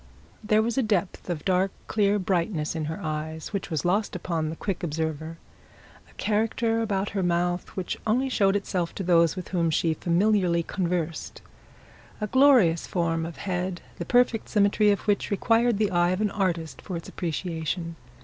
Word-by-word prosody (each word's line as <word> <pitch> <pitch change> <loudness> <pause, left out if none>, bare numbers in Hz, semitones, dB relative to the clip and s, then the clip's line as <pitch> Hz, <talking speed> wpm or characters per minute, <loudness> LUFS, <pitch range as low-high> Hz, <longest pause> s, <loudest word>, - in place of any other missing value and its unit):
There 215 0 +3
was 235 +3 0
a - - +4
depth 200 -5 -1
of 165 -4 -3
dark 190 +1 +2 0.2
clear 205 -1 +2
brightness 175 -4 -1
in 160 -1 -2
her 160 +2 -4
eyes 155 +3 -4
which 200 - -3
was 155 -2 -2
lost 200 +4 +1
upon 160 -3 -2
a - - -5
quick 195 +2 -3
observer, 160 0 -3 0.7
a - - -21
character 225 +2 0
about 200 -3 -1
her 200 - -2
mouth 175 0 0
which 185 - -3
only 250 +5 +2
showed 200 -6 +2
itself 180 -4 -2
to 195 - -3
those 170 -2 +4
with 185 - -6
whom 170 -3 +1
she 160 +1 +1
familiarly 175 0 +2
conversed, 170 -3 -3 0.8
a 210 - -1
glorious 240 - +4
form 165 -2 -1
of 170 - -9
head 180 -2 -3 0.2
the - - -2
perfect 245 +1 +2
symmetry 210 0 +3
of 200 - +2
which 205 -2 0
required 230 +2 +2
the 210 -1 +1
eyes 175 0 +3
of 185 - -2
an 210 -2 +1
artist 170 -7 -2
for 180 - -5
its 165 - -9
appreciation. 165 0 -3
180 Hz, 175 wpm, -26 LUFS, 165-205 Hz, 0.8 s, a